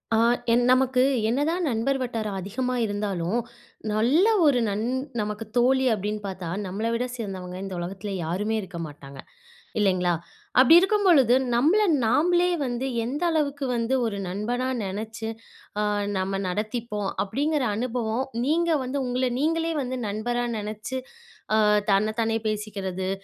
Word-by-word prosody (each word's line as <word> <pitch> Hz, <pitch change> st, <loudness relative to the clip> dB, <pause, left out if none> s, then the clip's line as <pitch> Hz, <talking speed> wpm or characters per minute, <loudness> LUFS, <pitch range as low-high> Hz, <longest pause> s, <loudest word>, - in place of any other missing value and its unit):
ஆ -, -, +3 dB, 0.4 s
என் 240 Hz, +1 st, +4 dB
நமக்கு 255 Hz, 0 st, +4 dB, 0.3 s
என்னதான் 310 Hz, +8 st, 0 dB
நண்பர் 255 Hz, +4 st, 0 dB
வட்டாரம் 220 Hz, -5 st, -3 dB
அதிகமா 235 Hz, +7 st, -2 dB
இருந்தாலும், 205 Hz, -2 st, -1 dB, 0.5 s
நல்ல 245 Hz, -, +3 dB, 0.2 s
ஒரு 280 Hz, -4 st, +4 dB
நன் 205 Hz, +1 st, -1 dB, 0.4 s
நமக்கு 210 Hz, +1 st, -3 dB
தோழி 260 Hz, +2 st, +4 dB
அப்டின்னு 210 Hz, 0 st, -3 dB
பாத்தா, 190 Hz, -3 st, -5 dB, 0.2 s
நம்மள 200 Hz, +5 st, -3 dB
விட 235 Hz, +2 st, 0 dB
சிறந்தவங்க 190 Hz, -6 st, -6 dB
இந்த 195 Hz, -1 st, -5 dB
உலகத்துல 190 Hz, +3 st, -5 dB
யாருமே 200 Hz, +7 st, -1 dB
இருக்க 185 Hz, -3 st, -8 dB
மாட்டாங்க 140 Hz, -2 st, -12 dB, 0.6 s
இல்லைங்களா. 185 Hz, -3 st, +2 dB, 0.5 s
அப்டி 265 Hz, +5 st, +8 dB
இருக்கும்பொழுது 360 Hz, -, +4 dB, 0.2 s
நம்மள 325 Hz, -, +4 dB, 0.2 s
நாமளே 350 Hz, +9 st, +3 dB, 0.2 s
வந்து 245 Hz, +1 st, -2 dB, 0.2 s
எந்த 280 Hz, +8 st, -3 dB
அளவுக்கு 285 Hz, -3 st, 0 dB
வந்து 230 Hz, +2 st, 0 dB
ஒரு 210 Hz, -3 st, -2 dB
நண்பனா 230 Hz, +7 st, -2 dB, 0.2 s
நெனைச்சு, 220 Hz, +3 st, -4 dB, 0.5 s
ஆ -, -, +2 dB, 0.4 s
நம்ம 195 Hz, +1 st, -1 dB
நடத்திப்போம் 210 Hz, +1 st, -2 dB
அப்டிங்குற 285 Hz, +6 st, 0 dB
அனுபவம் 240 Hz, 0 st, -1 dB, 0.2 s
நீங்க 335 Hz, +3 st, +2 dB
வந்து 260 Hz, +2 st, -2 dB
உங்கள 250 Hz, +1 st, 0 dB
நீங்களே 330 Hz, +2 st, +1 dB
வந்து 255 Hz, 0 st, -3 dB
நண்பரா 240 Hz, +4 st, -1 dB
நெனச்சு, 215 Hz, +4 st, -4 dB, 0.6 s
அ -, -, +4 dB, 0.3 s
தன்ன 215 Hz, +2 st, +2 dB
தானே 225 Hz, 0 st, +1 dB
பேசிக்குறது, 195 Hz, -3 st, -3 dB
225 Hz, 130 wpm, -25 LUFS, 200-260 Hz, 0.6 s, அப்டி